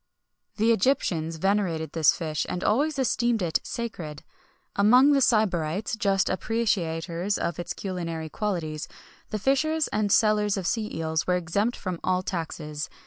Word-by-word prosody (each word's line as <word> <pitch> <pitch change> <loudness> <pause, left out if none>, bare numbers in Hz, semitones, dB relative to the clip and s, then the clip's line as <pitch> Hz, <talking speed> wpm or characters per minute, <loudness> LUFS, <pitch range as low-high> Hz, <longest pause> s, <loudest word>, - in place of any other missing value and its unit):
The 225 +2 +3
Egyptians 185 - +1
venerated 170 -4 0
this 160 -3 +4
fish, 155 -3 -2
and 180 - -3
always 285 +7 +1
esteemed 240 -4 +1
it 165 -2 +1
sacred.[XXI 175 -11 -6 0.5
72] - - +3
Among 250 +7 +6
the 280 -1 +4
Sybarites, 200 -4 +1
just 195 -3 +1
appreciators 185 -4 -1
of 170 - -3
its 175 - -4
culinary 170 -4 -4
qualities, 160 -5 -3 0.4
the 215 - -2
fishers 305 +7 +1
and 210 -1 0
sellers 210 -1 +3
of 190 - -3
sea 215 +2 -1
eels 160 0 -1
were 180 - +3
exempt 200 +7 0
from 185 -3 -4
all 185 0 +1
taxes. 155 -4 -4
190 Hz, 145 wpm, -26 LUFS, 165-220 Hz, 0.5 s, Among